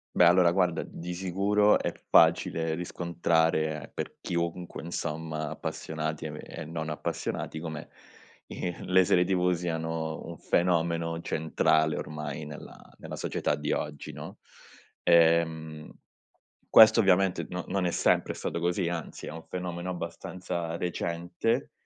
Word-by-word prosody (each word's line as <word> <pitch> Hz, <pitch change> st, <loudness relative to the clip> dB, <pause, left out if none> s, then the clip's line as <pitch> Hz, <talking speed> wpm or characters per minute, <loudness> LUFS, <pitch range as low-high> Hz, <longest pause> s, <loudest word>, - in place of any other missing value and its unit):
Beh 90 Hz, -, +6 dB
allora 85 Hz, 0 st, +6 dB
guarda 90 Hz, -2 st, +1 dB
di 90 Hz, +1 st, -7 dB
sicuro 100 Hz, +3 st, +3 dB
è -, -, -2 dB, 0.2 s
facile 80 Hz, -1 st, +4 dB
riscontrare 80 Hz, -3 st, 0 dB
per -, -, -5 dB
chiunque, 85 Hz, 0 st, -3 dB
insomma 80 Hz, -2 st, -3 dB
appassionati 80 Hz, 0 st, -4 dB
e 75 Hz, -1 st, -5 dB
e -, -, -7 dB
non 80 Hz, 0 st, -4 dB
appassionati, 80 Hz, 0 st, -3 dB
come, 80 Hz, -2 st, -6 dB, 0.6 s
i 90 Hz, -1 st, -4 dB
le 95 Hz, 0 st, +4 dB
serie 90 Hz, 0 st, +4 dB
TV 90 Hz, 0 st, +2 dB
siano 80 Hz, -2 st, -3 dB
un 85 Hz, 0 st, -8 dB
fenomeno 85 Hz, -1 st, +1 dB
centrale 80 Hz, -1 st, +1 dB
ormai 75 Hz, 0 st, -5 dB
nella 75 Hz, -1 st, -10 dB, 0.2 s
nella -, -, -7 dB
società -, -, -1 dB
di -, -, -3 dB
oggi, 75 Hz, -1 st, -3 dB
no. -, -, -9 dB, 0.6 s
Ehm, 80 Hz, -2 st, +3 dB, 0.8 s
questo 110 Hz, +1 st, +8 dB
ovviamente 95 Hz, -2 st, +3 dB
no 90 Hz, 0 st, -4 dB
non 95 Hz, -2 st, 0 dB
è 90 Hz, -, +1 dB
sempre -, -, +2 dB
stato 85 Hz, -, -4 dB
così, 90 Hz, +1 st, 0 dB
anzi, 85 Hz, -2 st, -5 dB
è -, -, -5 dB
un 80 Hz, +1 st, -8 dB
fenomeno 90 Hz, 0 st, -4 dB
abbastanza 85 Hz, -1 st, -4 dB
recente, 85 Hz, +8 st, -2 dB
85 Hz, 130 wpm, -28 LUFS, 80-90 Hz, 0.8 s, questo